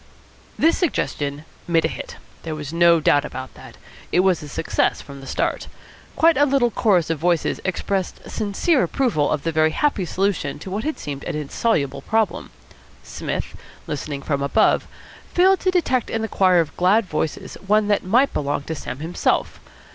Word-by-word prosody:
This 330 +2 +3
suggestion 145 - -2 0.2
made 165 -2 +2
a - - +3
hit. - - -7 0.3
There 160 -2 -5
was 150 0 -6
no 170 0 +5
doubt 145 -2 +3
about 130 0 -7
that. - - -13 0.3
It 180 - +4
was 185 -3 +2
a 150 - -8
success 160 - 0
from 140 -1 -10
the 135 - -10
start. - - -2 0.5
Quite 330 -2 +4
a 290 - +5
little 265 -4 +2
chorus 185 -8 +2
of 160 - -2
voices 170 0 0
expressed 190 0 -2
sincere 225 - +1
approval 230 - +1
of 145 - -1
the 165 - 0
very 155 0 +3
happy 210 - 0
solution 180 -6 -1
to 185 +5 -9
what 205 +3 -2
had 310 +2 -2
seemed 140 -2 -6
an - - -3
insoluble 150 - -1
problem. 220 +4 -1 0.5
Psmith, - - -5 0.3
listening 145 -1 -5
from 140 -2 -1
above, 140 - +2 0.5
failed 380 +2 +5
to 370 - +1
detect 325 -10 +1
in 225 0 -2
the - - -1
choir 185 -4 +3
of 160 - -5
glad 195 +5 +3
voices 155 -2 -3
one 210 +1 +3
that 205 - +2
might 245 +9 +3
belong 145 -1 -1
to 160 - -4
Sam 140 -2 -6
himself. 165 +3 -1
175 Hz, 180 wpm, -22 LUFS, 150-225 Hz, 0.5 s, no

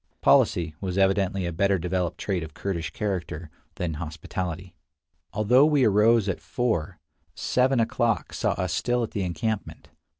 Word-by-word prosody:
Policy 85 -2 +3
was 95 -1 -3
evidently 95 -1 +2
a 85 - -3
better 100 +3 +2
developed 90 0 -2
trait 95 -4 -2
of 80 -1 -8
Kurdish 85 -5 -3
character 90 -6 -4 0.2
than 85 -3 -2
hospitality. 85 +3 -5 0.6
Although 125 +7 +4
we 145 -3 +3
arose 105 +1 +4
at 95 - -2
four, 115 -11 -2 0.4
seven 130 0 +1
o'clock 115 -2 0
saw - - 0
us 90 -2 -2
still 120 0 0
at 115 - -4
the 100 - -2
encampment. 100 +4 -3
95 Hz, 145 wpm, -26 LUFS, 85-110 Hz, 0.6 s, Although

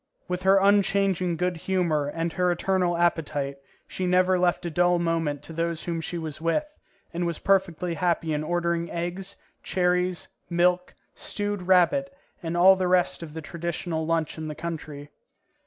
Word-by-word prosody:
With 180 0 -3
her 190 +1 +5
unchanging 195 -3 +2
good 180 0 -1
humour 165 -5 0
and 165 +3 -3
her 180 -1 +2
eternal 175 0 0
appetite, 145 -5 0 0.3
she 185 - -3
never 185 0 +3
left 175 -1 +1
a 170 - -2
dull 175 +2 +3
moment 165 -4 -1
to 165 - -9
those 165 0 -2
whom 170 -1 -3
she 175 - -4
was 155 -2 -6
with, 300 - -1 0.4
and 175 +1 -1
was 170 -2 -2
perfectly 180 -3 +1
happy 165 -2 0
in 150 0 -1
ordering 170 +1 -1
eggs, 180 +3 -4 0.2
cherries, 180 -1 0 0.2
milk, 180 +1 +1 0.2
stewed 205 -1 -3
rabbit, 190 +10 +3 0.3
and 170 -1 -3
all 190 +2 +7
the 185 -1 -1
rest 175 -6 +2
of 160 -2 -9
the 160 - -6
traditional 170 +1 -3
lunch 165 -1 -1
in 155 - -4
the 150 - -5
country. 150 -3 -6
175 Hz, 165 wpm, -26 LUFS, 165-185 Hz, 0.4 s, all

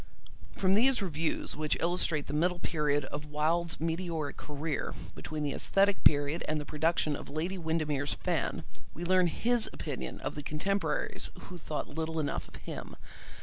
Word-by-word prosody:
From 190 0 +3
these 245 +5 +5
reviews 165 -5 -1
which 155 0 +1
illustrate 170 -3 +1
the - - -5
middle 175 +4 +2
period 150 -4 +1
of 145 +2 -5
Wilde's 160 +3 +1
meteoric 165 -2 -1
career, 150 0 -3 0.2
between 155 -1 -4
the 145 - 0
aesthetic 200 0 +3
period 145 +3 +4
and 155 0 +1
the 150 - -5
production 155 0 +1
of - - -8
Lady 170 +6 -2
Windermere's 155 -3 0
Fan, - - -1 0.3
we 170 - -5
learn 185 0 +5
his 235 +7 +1
opinion - - -4
of - - -2
the 150 - -4
contemporaries 195 +8 -1
who 180 -2 -8
thought 150 -1 -3
little 160 +1 -2
enough 150 - -1
of - - -13
him. - - -7
160 Hz, 160 wpm, -31 LUFS, 150-175 Hz, 0.3 s, these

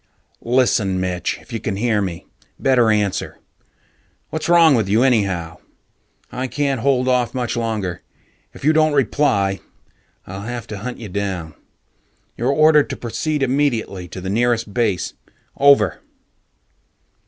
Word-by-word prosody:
"Listen, 115 -6 +1
Mitch 90 -2 -2
if 120 - -14
you 115 - -2
can 100 - -3
hear 110 0 +1
me, 90 -4 -5 0.3
better 125 -4 +3
answer. 105 -3 0 0.9
What's 160 +1 -3
wrong 170 -3 +6
with 110 -6 +1
you 110 +5 +3
anyhow? 95 -10 0 0.7
I 130 +1 -3
can't 140 -2 -1
hold 130 -1 +2
off 125 -1 +1
much 125 -2 -2
longer. 110 -7 -3 0.5
If - - -10
you 155 - +5
don't 155 -1 +3
reply, 100 -8 +1 0.7
I'll 95 +1 -7
have 120 +2 -5
to 105 - -6
hunt 125 +4 -5
you 115 - -8
down. 90 -5 -4 0.8
You're 120 +3 -1
ordered 155 0 +4
to - - -5
proceed 135 +6 -2
immediately 125 -9 -1
to 95 - -8
the 95 +1 -4
nearest 115 -1 0
base. 105 -7 0 0.4
Over." 140 - +4
115 Hz, 140 wpm, -20 LUFS, 100-130 Hz, 0.9 s, wrong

